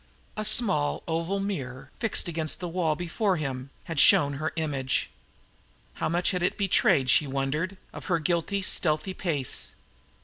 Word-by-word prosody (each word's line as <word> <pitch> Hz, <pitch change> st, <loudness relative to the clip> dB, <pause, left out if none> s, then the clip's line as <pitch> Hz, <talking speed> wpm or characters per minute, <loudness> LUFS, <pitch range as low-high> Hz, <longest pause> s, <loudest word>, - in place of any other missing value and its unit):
A 215 Hz, -, -3 dB
small 190 Hz, -, +1 dB
oval 170 Hz, +4 st, -1 dB
mirror, 135 Hz, -11 st, -5 dB
fixed 225 Hz, -5 st, +1 dB
against 160 Hz, -2 st, -1 dB
the 180 Hz, -, -4 dB
wall 165 Hz, -3 st, 0 dB
before 180 Hz, +4 st, -1 dB
him, 135 Hz, -3 st, -4 dB
had 165 Hz, -3 st, -3 dB
shown 140 Hz, +1 st, +7 dB
her 155 Hz, -, -1 dB
image. 140 Hz, -5 st, -1 dB, 0.8 s
How -, -, -2 dB
much 175 Hz, +2 st, +1 dB
had 180 Hz, -2 st, -2 dB
it 180 Hz, -, 0 dB
betrayed, 180 Hz, -9 st, +3 dB
she 140 Hz, +4 st, +4 dB
wondered, 140 Hz, +8 st, -2 dB, 0.2 s
of -, -, -9 dB
her 175 Hz, -4 st, +1 dB
guiltily 175 Hz, +4 st, -1 dB
stealthy 175 Hz, +1 st, +1 dB
pace? 150 Hz, -9 st, -1 dB
165 Hz, 150 wpm, -27 LUFS, 140-185 Hz, 0.8 s, shown